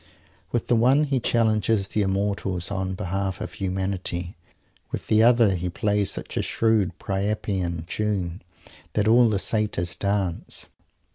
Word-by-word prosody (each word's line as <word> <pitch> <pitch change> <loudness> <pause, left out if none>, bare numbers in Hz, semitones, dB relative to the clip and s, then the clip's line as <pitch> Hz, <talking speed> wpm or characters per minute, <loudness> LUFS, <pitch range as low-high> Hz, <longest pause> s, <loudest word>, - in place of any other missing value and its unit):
With 120 - 0
the 120 - +2
one 130 +6 +4
he 140 -3 0
challenges 110 -3 +2
the 105 - 0
Immortals 95 -2 -1
on 95 -1 -2
behalf 95 0 -2
of 110 - -6
humanity; 95 -2 -3 0.5
with - - -5
the 110 0 +4
other 115 -3 +5
he 90 0 -2
plays 105 +2 0
such - - -6
a - - +2
shrewd 110 -5 +1
Priapian 95 -4 -2
tune 95 -2 -2 0.5
that 105 0 +1
all 120 +1 +6
the 105 - +1
Satyrs 95 -4 0
dance. 100 -4 -2
100 Hz, 140 wpm, -25 LUFS, 95-110 Hz, 0.5 s, all